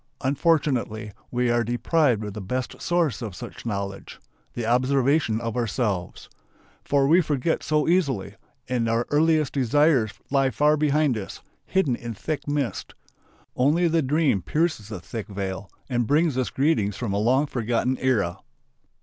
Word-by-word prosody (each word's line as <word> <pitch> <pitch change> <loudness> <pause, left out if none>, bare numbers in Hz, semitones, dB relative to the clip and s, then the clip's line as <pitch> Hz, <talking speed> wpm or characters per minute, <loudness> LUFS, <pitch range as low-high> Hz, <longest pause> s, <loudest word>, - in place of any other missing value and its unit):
Unfortunately 130 -6 0 0.2
we 125 -1 0
are 120 0 +2
deprived 120 +1 +1
of 105 -2 -5
the 105 - -6
best 125 +6 -4
source 170 -7 0
of 105 -6 -5
such 105 - -9
knowledge: 100 -2 -5 0.4
the 120 - -3
observation 130 0 +2
of 115 0 -4
ourselves. 105 -6 -2 0.6
For 140 -1 +2
we 165 +6 +5
forget 150 0 -1
so 150 -1 0
easily, 145 - +1 0.3
and 120 -2 0
our 115 +1 +1
earliest 155 -1 +2
desires 135 -3 +2 0.2
lie 135 -1 +3
far 150 +4 +3
behind 150 -4 +2
us, 95 - -8 0.3
hidden 190 -10 +1
in 120 -1 -7
thick 155 +9 -4
mist. 145 -4 -2 0.6
Only 150 +7 +3
the 165 0 +2
dream 145 - +1
pierces 150 - -1
the 105 -4 -5
thick 105 +5 -7
veil 95 -1 -5 0.2
and 120 -3 0
brings 150 +1 +2
us 130 -1 0
greetings 130 -9 +1
from 115 -5 -3
a 100 - 0
long 130 +7 +3
forgotten 125 -1 -1
era. 105 -9 0
125 Hz, 150 wpm, -24 LUFS, 110-150 Hz, 0.6 s, we